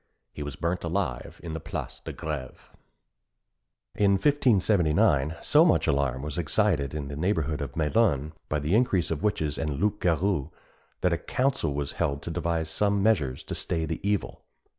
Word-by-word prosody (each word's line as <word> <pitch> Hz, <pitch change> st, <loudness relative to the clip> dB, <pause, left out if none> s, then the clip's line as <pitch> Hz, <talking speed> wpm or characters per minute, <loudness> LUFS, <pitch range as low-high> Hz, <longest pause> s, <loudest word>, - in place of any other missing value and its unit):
He -, -, -7 dB
was 75 Hz, -2 st, -5 dB
burnt 85 Hz, +2 st, -2 dB
alive 85 Hz, -7 st, -3 dB
in 85 Hz, -2 st, -5 dB
the 80 Hz, -, -3 dB
Place 80 Hz, +1 st, -6 dB
de -, -, -7 dB
Grève. 75 Hz, -5 st, -5 dB, 1.4 s
In 100 Hz, -1 st, +3 dB
1579, 95 Hz, -, +3 dB
so -, -, +5 dB
much -, -, +3 dB
alarm 70 Hz, -2 st, 0 dB
was 75 Hz, +3 st, -3 dB
excited 80 Hz, -4 st, +1 dB
in 75 Hz, -2 st, -4 dB
the 70 Hz, -, -6 dB
neighbourhood 80 Hz, -3 st, 0 dB
of 70 Hz, -3 st, -5 dB
Melun 80 Hz, -, +2 dB, 0.2 s
by 75 Hz, -, +1 dB
the 75 Hz, +4 st, -1 dB
increase 100 Hz, -8 st, +2 dB
of 80 Hz, -2 st, -2 dB
witches 80 Hz, -8 st, -1 dB
and 75 Hz, -3 st, -2 dB
loup 105 Hz, +2 st, 0 dB
garous, 85 Hz, -3 st, +1 dB, 0.5 s
that -, -, +2 dB
a -, -, -1 dB
council 130 Hz, -, 0 dB
was 70 Hz, -1 st, -2 dB
held 70 Hz, 0 st, 0 dB
to 85 Hz, -, -4 dB
devise 80 Hz, -1 st, -1 dB
some 100 Hz, -1 st, +1 dB
measures 75 Hz, -13 st, +1 dB
to -, -, -6 dB
stay 80 Hz, -2 st, -1 dB
the 80 Hz, 0 st, -3 dB
evil. 100 Hz, 0 st, -2 dB
80 Hz, 170 wpm, -27 LUFS, 75-100 Hz, 1.4 s, so